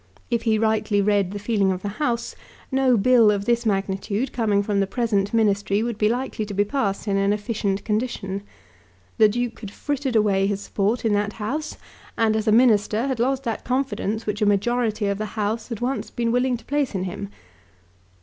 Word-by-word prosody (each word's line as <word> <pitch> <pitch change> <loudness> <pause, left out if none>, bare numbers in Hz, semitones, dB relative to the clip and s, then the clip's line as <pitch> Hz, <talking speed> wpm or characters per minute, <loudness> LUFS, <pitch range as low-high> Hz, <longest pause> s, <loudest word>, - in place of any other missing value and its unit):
If 235 -1 +1
he 225 -2 +2
rightly 220 -1 +1
read 200 -2 +2
the 205 - -5
feeling 205 -2 +1
of 185 0 -4
the 205 0 -5
House, 235 -5 -1 0.4
no 265 -2 +3
Bill 235 +1 +5
of 200 -1 0
this 235 0 +1
magnitude 200 +4 -1
coming 210 -4 +1
from 200 -1 0
the 195 - +1
present 205 -3 0
Ministry 205 -2 +1
would 235 -2 -3
be 210 - +3
likely 245 -2 -2
to 200 - -6
be 205 +1 +2
passed 205 -4 -2
in 200 -1 +1
an 195 0 +2
efficient 205 -2 -2
condition. 210 -3 -2 0.8
The 215 - +7
Duke 240 +2 -3
had 210 - -7
frittered 275 +3 -3
away 200 -3 +3
his 200 -1 -1
support 210 +4 -1
in 220 - +2
that 205 0 0
House, 295 +9 -4 0.4
and 220 -1 +2
as 220 0 -1
a - - +5
Minister 220 -1 +4
had 265 -3 -2
lost 265 +2 +1
that 230 -3 -3
confidence 250 -4 -2
which 210 +1 -3
a - - +4
majority 215 +1 +1
of 200 0 -1
the 215 - -2
House 215 +2 -1
had 230 -3 -6
once 260 +3 -2
been 235 -2 -1
willing 250 +1 +1
to 235 - -18
place 285 -5 -1
in 185 - -1
him. 190 +2 -5
215 Hz, 200 wpm, -23 LUFS, 200-240 Hz, 0.8 s, The